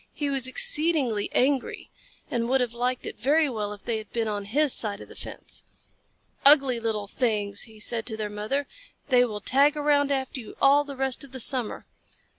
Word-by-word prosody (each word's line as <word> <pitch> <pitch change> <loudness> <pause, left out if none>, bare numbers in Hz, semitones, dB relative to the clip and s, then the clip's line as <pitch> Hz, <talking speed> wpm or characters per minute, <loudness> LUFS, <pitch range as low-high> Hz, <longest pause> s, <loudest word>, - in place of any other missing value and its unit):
He 290 -2 -2
was 265 -2 -1
exceedingly 300 - +1
angry, 265 0 0 0.4
and 235 0 -1
would 265 +1 +3
have 245 -2 -1
liked 245 +1 -2
it - - -7
very 300 +4 +3
well 215 -5 -3
if 205 -1 -10
they 225 -2 -1
had 215 - -11
been 230 -1 -1
on 205 -1 -3
his 280 +6 +2
side 205 -2 +2
of - - -10
the - - -13
fence. - - -6 0.8
"Ugly 275 -4 +5
little 220 -2 -2
things!" 205 -2 -1
he 220 -1 -15
said 225 +1 0
to 220 -3 -3
their 215 -1 -3
mother. 215 +8 -2 0.4
"They 250 -2 +5
will 210 -3 -5
tag 285 +6 +3
around 290 -1 +2
after 265 -1 -2
you 225 - -10
all 280 +1 +5
the 280 -2 -9
rest 265 +1 -1
of 270 -2 -14
the 260 - -5
summer." 250 -2 0
250 Hz, 200 wpm, -26 LUFS, 220-280 Hz, 0.8 s, Ugly